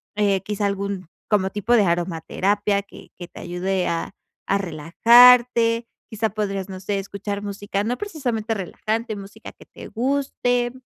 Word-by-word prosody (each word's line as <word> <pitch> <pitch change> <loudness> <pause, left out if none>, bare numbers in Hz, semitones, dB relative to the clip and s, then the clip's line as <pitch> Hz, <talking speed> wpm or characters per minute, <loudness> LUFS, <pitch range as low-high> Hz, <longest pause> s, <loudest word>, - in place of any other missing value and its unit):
eh, 200 -2 +2
quizá 205 +1 -3
algún, 200 -2 -3 0.2
como 195 -3 +2
tipo 210 +4 0
de 220 - +5
aromaterapia, 190 +4 0
que 200 - -15
que 175 - -8
te - - -12
ayude 180 +1 -2
a 165 +3 -3 0.3
a 195 - +2
relajarte, 230 +7 +5 0.2
quizá 220 0 -1
podrías, 195 -2 -3
no 190 -1 -7
sé, 195 +1 -2
escuchar 200 +1 -5
música, 200 0 -3
no 245 +2 -1
precisamente 245 - -3
relajante, 220 +3 -3
música 200 +2 -10
que - - -17
te - - -12
guste, 245 -1 0
205 Hz, 150 wpm, -22 LUFS, 195-230 Hz, 0.3 s, de